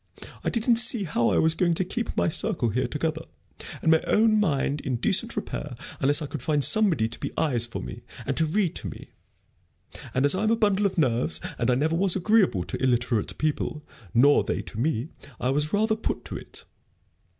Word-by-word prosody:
I - - 0
didn't 230 0 +2
see 235 -2 +2
how 150 -9 +1
I - - +1
was 160 0 +3
going 170 0 +1
to 185 - -1
keep 235 +6 -4
my - - +2
circle 125 -6 +1
here 125 +4 -1
together, 155 +4 -2 0.6
and 160 - +4
my 160 - +4
own 215 0 +3
mind 145 -6 0
in 130 -2 -2
decent 115 - +2
repair, - - -5 0.2
unless 145 +3 +3
I - - -3
could - - -6
find 150 -2 0
somebody 180 - +3
to 115 - -10
be - - -4
eyes 125 -7 +1
for 115 - -6
me, 120 - -8 0.2
and 135 - -2
to 160 - +2
read 180 +1 0
to - - -5
me. - - -11 1.0
And 130 +2 +2
as 145 - +5
I'm 210 +3 0
a 230 - +4
bundle 205 -2 +2
of 190 - -7
nerves, 125 -6 +1 0.2
and 115 - +1
I 125 - +3
never 155 +5 0
was 185 +1 +3
agreeable 190 - +2
to - - -6
illiterate 120 -3 0
people, 155 0 -2 0.3
nor 140 +5 +5
they - - -3
to 110 - -8
me, 140 0 -1 0.3
I 125 - 0
was 150 +3 0
rather 220 +1 +2
put 220 - -4
to - - -6
it. - - -7
155 Hz, 205 wpm, -25 LUFS, 130-195 Hz, 1.0 s, as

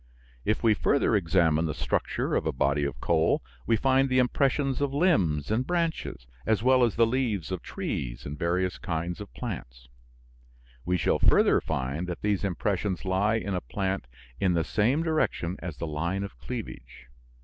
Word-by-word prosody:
If 110 - 0
we 115 -2 +5
further 135 +1 +2
examine 85 -4 +2
the 75 - -3
structure - - -1
of - - +1
a - - +2
body 70 +1 +1
of 65 -3 -4
coal 80 -3 +2 0.2
we 115 - +4
find 135 +3 +3
the 130 - +2
impressions 135 +2 +1
of 140 -1 0
limbs 95 - +2
and 120 +4 0
branches 165 - -2 0.2
as 110 - +1
well 130 0 +5
as 115 -4 +2
the 115 - +5
leaves 115 -8 -1
of 95 - -3
trees - - -4
and 70 - -5
various 90 +3 -1
kinds 85 +2 -3
of 100 - -9
plants. - - -7 1.0
We 90 +1 +1
shall - - +1
further - - +4
find 70 +7 -3
that 90 -1 -5
these 105 -2 +1
impressions 100 0 -1
lie 100 +4 +2
in 100 -3 -2
a 90 - -1
plant 95 -8 -3 0.3
in 95 -2 +2
the 85 - +2
same 125 - +1
direction 155 - 0
as 85 -6 -6
the - - -3
line 85 +5 -2
of 100 - -7
cleavage. 115 - -7
95 Hz, 175 wpm, -27 LUFS, 80-120 Hz, 1.0 s, we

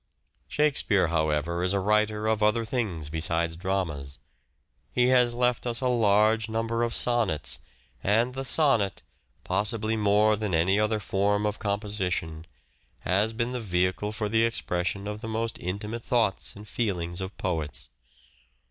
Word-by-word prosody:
Shakespeare, 140 - +2
however, 80 +1 0
is 90 +2 +1
a - - +2
writer 105 +2 +1
of 110 0 +1
other 105 +2 +2
things 100 - -3
besides 80 +1 -1
dramas. 85 -7 -3 0.7
He 125 0 +2
has 125 -2 +4
left 125 0 0
us 120 -1 +3
a 130 - 0
large 110 -1 +3
number 115 +1 -1
of 120 -1 0
sonnets, 115 -11 +1 0.4
and 115 +5 +2
the 135 +1 -4
sonnet, 135 -8 +2 0.4
possibly 110 +1 0
more 105 0 +3
than 105 -4 -2
any 95 +5 +3
other 105 0 +1
form 105 +1 0
of 105 0 -2
composition, 95 -6 -2 0.5
has 100 +5 +1
been 120 +2 -2
the 125 -1 -3
vehicle 95 +1 0
for 110 -1 -3
the 110 +2 +2
expression 100 -4 -1
of 105 +1 -5
the 115 - -6
most 115 +1 -2
intimate 105 +6 -4
thoughts 115 -6 0
and 105 +1 -11
feelings 90 -5 -2
of 95 +2 -6
poets. 80 -9 -3
105 Hz, 150 wpm, -27 LUFS, 90-115 Hz, 0.7 s, has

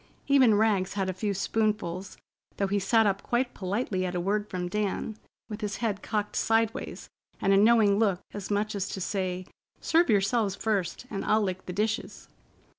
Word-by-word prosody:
Even 265 -6 +5
Rags 205 -3 +2
had 190 -1 -1
a - - -7
few 200 +3 -2
spoonfuls, 195 -3 -1 0.4
though 200 - +1
he 200 +1 0
sat 225 +4 +3
up 195 -1 +1
quite 245 +1 -1
politely 190 0 -2
at 180 -1 -3
a - - 0
word 205 +4 -1
from 180 -1 -3
Dan, 210 +2 -2 0.3
with 215 +1 -7
his 205 -2 -2
head 210 -4 -2
cocked 210 -2 -2
sideways, 225 0 0 0.3
and 195 - +3
a - - +5
knowing 210 -1 +5
look, 200 -5 +2
as 205 -2 -6
much 210 +1 0
as 195 -2 -2
to - - -5
say, 185 -1 -2 0.3
"Serve 335 +2 +3
yourselves 205 0 +2
first, 205 0 -2
and 195 - -3
I'll 215 0 +2
lick 185 -1 -4
the 180 - -4
dishes." 220 +4 -2
205 Hz, 185 wpm, -28 LUFS, 190-220 Hz, 0.4 s, Even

